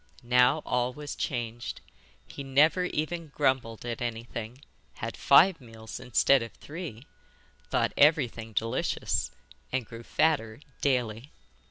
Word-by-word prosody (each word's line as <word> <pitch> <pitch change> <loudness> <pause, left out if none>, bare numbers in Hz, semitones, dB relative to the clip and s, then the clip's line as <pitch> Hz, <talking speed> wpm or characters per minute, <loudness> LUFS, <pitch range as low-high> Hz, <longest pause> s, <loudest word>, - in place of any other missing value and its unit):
Now 125 +5 +4
all 125 0 0
was 150 +1 -6
changed. 120 -2 -4 0.5
He 140 - -8
never 150 +7 +3
even 165 0 -3
grumbled 130 -6 0
at 120 -1 -4
anything, 120 +2 -5 0.3
had - - -5
five 180 -3 +5
meals 110 -2 -9
instead 125 +3 +3
of 115 - -6
three, 150 -6 -8 0.6
thought - - +1
everything 125 -7 +3
delicious, 115 +2 -1 0.4
and 130 -2 -1
grew 115 +2 -10
fatter 120 -3 0 0.2
daily. 125 -1 0
125 Hz, 120 wpm, -28 LUFS, 115-145 Hz, 0.6 s, five